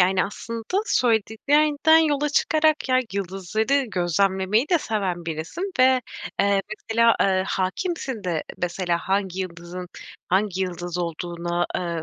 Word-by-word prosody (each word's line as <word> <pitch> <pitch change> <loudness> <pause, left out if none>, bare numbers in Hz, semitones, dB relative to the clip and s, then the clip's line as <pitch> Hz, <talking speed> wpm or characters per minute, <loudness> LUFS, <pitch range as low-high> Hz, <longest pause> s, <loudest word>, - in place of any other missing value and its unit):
Yani, 185 +1 +3
aslında 230 - -4
söylediklerinden 290 - +3
yola 295 -2 +2
çıkarak, 310 0 +2
ya, 255 0 +4
yıldızları 200 +8 0
gözlemlemeyi 190 - +1
de 345 - +4
seven 190 - -2
birisin 165 - -4
ve, 260 0 +5 0.4
eee, 200 -1 +2 0.3
mesela, 230 +1 +5
eee, 190 -1 +2
hâkimsin 225 - -2
de, 165 -4 -1 0.2
mesela, 175 -1 0
hangi 190 0 -1
yıldızın 175 0 -6 0.4
hangi 190 0 +1
yıldız 175 -1 -4
olduğuna, 175 +1 -2
eee, 170 -2 -3
195 Hz, 120 wpm, -24 LUFS, 175-255 Hz, 0.4 s, ve